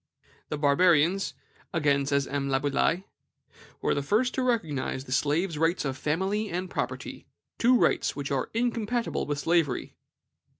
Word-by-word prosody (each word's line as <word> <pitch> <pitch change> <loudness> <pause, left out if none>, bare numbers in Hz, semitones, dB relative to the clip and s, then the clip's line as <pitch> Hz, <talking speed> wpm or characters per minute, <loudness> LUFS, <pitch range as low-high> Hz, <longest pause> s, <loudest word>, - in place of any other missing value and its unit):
"The 150 - -2
Barbarians," 165 +5 +3 0.4
again 140 -4 +1
says 140 -1 +1
M. 140 -1 -2
Laboulaye, 140 +6 +1 0.8
"were - - +2
the 145 - -1
first 215 - +1
to - - -1
recognize 160 - -1
the 125 - -11
slave's 150 +5 +1
rights 165 0 +1
of 135 -1 -2
family 190 +10 -1
and 180 +1 -4
property, - - -4 0.3
two 250 +2 +5
rights - - +2
which 145 -1 -4
are 135 -2 -1
incompatible 235 0 -1
with 145 -1 -1
slavery." 165 -4 0
155 Hz, 140 wpm, -27 LUFS, 140-195 Hz, 0.8 s, two